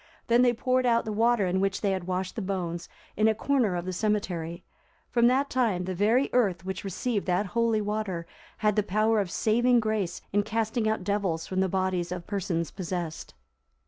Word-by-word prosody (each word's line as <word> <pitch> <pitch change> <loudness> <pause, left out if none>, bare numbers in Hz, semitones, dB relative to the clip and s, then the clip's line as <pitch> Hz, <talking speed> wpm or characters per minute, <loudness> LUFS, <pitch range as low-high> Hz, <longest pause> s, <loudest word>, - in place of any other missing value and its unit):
Then 235 +1 +5
they 250 -1 +5
poured 255 +2 +1
out 235 -1 +3
the 220 - -3
water 225 0 +2
in 185 +1 0
which 195 0 0
they 200 - +1
had 185 -2 -3
washed 185 0 -2
the 225 - -3
bones, 175 -3 -3 0.3
in 215 +1 +3
a 220 - +3
corner 240 -5 +1
of 175 0 -3
the 185 - -3
cemetery.(345) 180 -4 -4
From 235 -1 +5
that 265 +3 +3
time, 225 -8 +1
the 185 - -3
very 220 +9 +3
earth 190 -8 +1
which 190 -2 -4
received 200 +3 -2
that 180 +3 +1
holy 225 +2 +1
water, 205 -5 -2 0.3
had 210 -2 +1
the 210 - +3
power 215 +2 +2
of 195 -3 -1
saving 240 +5 +3
grace 215 -5 -2
in 205 - +4
casting 220 +1 -1
out 220 -3 -1
devils 190 -5 -1
from 185 - -2
the 190 0 +2
bodies 185 -2 -1
of 175 -1 -5
persons 175 -5 -2
possessed. 175 -4 -5
205 Hz, 200 wpm, -27 LUFS, 185-225 Hz, 0.3 s, Then